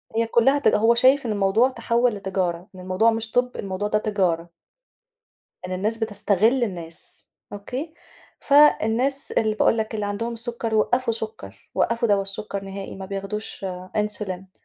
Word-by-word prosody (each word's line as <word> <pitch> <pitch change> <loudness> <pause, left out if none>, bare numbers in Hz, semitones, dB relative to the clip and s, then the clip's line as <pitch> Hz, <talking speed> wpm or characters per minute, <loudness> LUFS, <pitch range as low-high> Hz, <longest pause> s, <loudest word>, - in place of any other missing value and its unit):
هي 230 0 +1
كلّها 265 +5 +3
ت - - +1
هو 225 +2 +4
شايف 260 +3 +4
إن 225 - -1
الموضوع 205 +5 +3
تحول 235 -1 +1
لتجارة. 190 -3 -2
إن - - -11
الموضوع 185 +5 +2
مش 225 0 -3
طب، 250 0 +1
الموضوع 195 +1 -3
ده 210 - +1
تجارة. 180 -6 0 1.2
إن 185 - -6
الناس 210 +5 0
بتستغِل 220 +3 +2
الناس. 170 -6 -4 0.2
أوكي، 255 +10 -6 0.5
فالناس 275 -2 +3
اللي 220 -1 +1
باقول 225 +1 +2
لَك، 220 +1 -2
اللي 210 -1 -2
عندهُم 230 +4 -3
السُكر 235 -1 -3
وقفوا 245 +3 +2
سُكَّرُ، 215 - -8
وقفوا 230 +5 +1
دوا 200 -1 +3
السُكَّر 195 0 -4
نهائي. 195 0 -7
ما 190 0 -7
بياخدوش 195 +1 -5 0.3
Insulin. 195 -3 -2
215 Hz, 150 wpm, -23 LUFS, 195-235 Hz, 1.2 s, هو